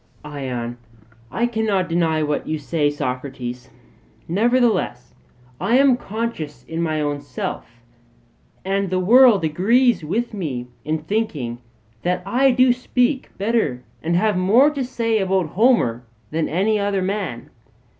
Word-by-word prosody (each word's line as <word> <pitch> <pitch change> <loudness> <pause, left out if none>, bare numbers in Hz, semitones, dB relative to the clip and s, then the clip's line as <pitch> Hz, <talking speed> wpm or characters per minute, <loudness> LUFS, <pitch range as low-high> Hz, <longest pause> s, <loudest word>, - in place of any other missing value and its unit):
ION: 125 -5 -5 0.5
I 235 - 0
cannot 220 -6 0
deny 165 -2 +1
what 150 -1 -2
you 155 - -1
say, 150 0 0
Socrates. 125 -3 -5 0.6
Nevertheless 235 +5 +1 0.5
I 240 - +2
am 275 -2 +5
conscious 220 - -5
in 165 +1 -4
my 155 -2 -1
own 145 -1 -2
self, 120 -3 -6 0.8
and 195 0 0
the 185 - 0
world 225 +1 +6
agrees 220 - +2
with 225 +10 -2
me 145 -11 -4 0.2
in 155 0 -2
thinking 155 - -2 0.4
that 180 0 -1
I 255 +7 +3
do 255 0 +4
speak 250 +2 0
better 200 - 0 0.2
and 170 +2 0
have 210 +3 +2
more 220 +11 +4
to 280 -3 -3
say 230 -3 0
about 190 -4 0
Homer 185 - +2 0.3
than 160 0 -1
any 205 +6 +1
other 200 -2 0
man. 185 - -4
185 Hz, 135 wpm, -21 LUFS, 150-230 Hz, 0.8 s, world